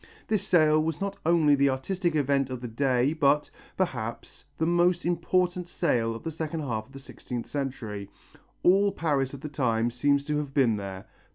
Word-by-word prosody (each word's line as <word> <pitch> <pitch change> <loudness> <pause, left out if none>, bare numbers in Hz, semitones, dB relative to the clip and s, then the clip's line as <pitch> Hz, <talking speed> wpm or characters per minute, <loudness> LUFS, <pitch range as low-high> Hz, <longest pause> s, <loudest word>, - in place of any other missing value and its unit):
This 215 -3 0
sale 155 -3 +4
was 160 -1 -2
not 200 0 -4
only 165 -3 +4
the 140 0 +4
artistic 170 +6 -1
event 140 -2 +1
of 130 -1 -4
the 120 - -6
day 130 +3 +1
but, 145 -1 +2 0.3
perhaps, 120 -10 -4
the 160 - +1
most 175 +1 +2
important 175 +1 0
sale 120 -11 0
of 115 - -9
the 165 - -3
second 160 0 -4
half 110 -6 -3
of - - -21
the - - -9
sixteenth 125 -3 -7
century. 115 -8 -5 0.5
All 200 +3 +5
Paris 145 -7 -1
of 135 - -11
the - - -5
time 120 -5 0
seems 140 +3 +1
to 150 0 -1
have 145 -2 -4
been 120 -6 +3
there. 95 -1 -7
145 Hz, 185 wpm, -27 LUFS, 125-170 Hz, 0.5 s, All